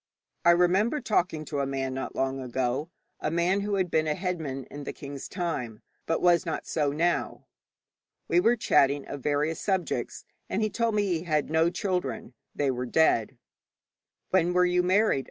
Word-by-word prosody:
I 170 - +5
remember 185 - +3
talking 175 - 0
to 145 -2 -3
a 140 - 0
man 135 -1 -2
not 130 0 -5
long 135 0 -1
ago 130 +4 -2 0.3
a - - -1
man 175 +4 +1
who 205 0 -1
had 185 -3 0
been 155 0 +2
a 150 - +1
headman 160 -8 -3
in 145 +3 -9
the - - -5
king's 140 -1 -8
time, 160 - -4 0.2
but 165 - 0
was 175 -1 +5
not 165 -3 -4
so 150 -3 0
now. 170 +4 -1 0.8
We - - +3
were 240 -9 +4
chatting 140 - +2
of 145 - -7
various 150 +3 0
subjects, 190 -3 -2 0.2
and - - 0
he 215 - 0
told 230 -1 0
me 205 -1 +2
he 170 -4 -1
had 155 -2 0
no 160 +1 +3
children; 175 - -3 0.2
they 140 -2 +1
were 125 0 -3
dead. 130 -4 +2 0.9
'When 180 -1 +3
were 180 0 +4
you 180 0 +2
married?' 185 -2 +3
160 Hz, 180 wpm, -27 LUFS, 140-180 Hz, 0.9 s, I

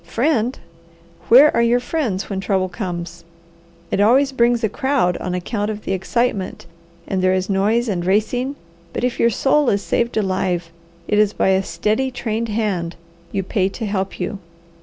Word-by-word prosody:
Friend? 235 - 0 0.7
Where 275 +6 +7
are - - +3
your 235 +1 +3
friends 245 - -2
when 195 -2 -3
trouble 190 -1 0
comes? 175 -2 -5 0.7
It 200 - +1
always 265 +6 +4
brings 240 -2 +2
a - - +4
crowd 265 -6 0
on 180 0 -3
account 205 +4 -2
of 215 -1 -5
the - - -2
excitement, 195 0 -1 0.4
and 190 -1 -1
there 185 0 +3
is 185 +1 -1
noise 215 +5 +2
and 185 -5 -1
racing; 220 +8 0 0.4
but - - -3
if 250 -1 -1
your 235 - +4
soul 275 +3 +2
is 200 -1 0
saved 235 -1 0
alive, 185 -4 -1 0.4
it 210 - +2
is 210 -1 +3
by - - +1
a 190 0 +3
steady, 220 +6 -1
trained 230 -2 -3
hand 195 -6 -1 0.4
you 195 - -1
pay 190 0 0
to 225 +3 -5
help 195 -2 -3
you. 190 +2 -3
210 Hz, 175 wpm, -20 LUFS, 190-240 Hz, 0.7 s, Where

